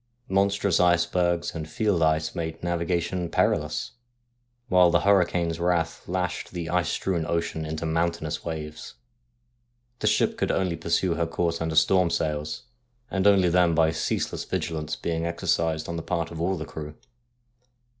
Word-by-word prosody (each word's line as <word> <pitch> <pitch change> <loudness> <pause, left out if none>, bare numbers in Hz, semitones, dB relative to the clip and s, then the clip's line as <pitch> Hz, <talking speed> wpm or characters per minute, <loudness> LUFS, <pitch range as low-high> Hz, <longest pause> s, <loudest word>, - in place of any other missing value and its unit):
Monstrous 100 -1 +2
icebergs 85 -1 +2
and 80 -2 -6
field 100 0 0
ice 80 0 +2
made 80 -2 -5
navigation 85 0 -1
perilous, - - 0 0.8
while 90 -5 +5
the 85 0 +3
hurricane's 90 -4 +2
wrath 85 -1 0
lashed 90 -1 -2
the 85 -1 -4
ice 90 -2 +1
strewn 90 -4 -1
ocean 80 -2 -2
into 80 +1 -4
mountainous 80 -1 -1
waves. 75 -2 -6 1.0
The - - 0
ship - - +2
could - - 0
only 90 -3 0
pursue 85 +2 0
her 85 0 -1
course 85 0 -1
under 80 -1 -2
storm 90 +2 +4
sails, 75 -2 -2 0.5
and 95 +1 +2
only 95 -3 +5
then 85 -1 +3
by 80 -1 +4
ceaseless 80 - -2
vigilance 80 -1 -3
being 85 0 -2
exercised 85 -2 0
on 85 - -4
the - - -3
part 85 -1 -2
of 80 -1 -6
all 95 +2 0
the 80 - -5
crew. 75 -1 -8
85 Hz, 150 wpm, -26 LUFS, 80-90 Hz, 1.0 s, while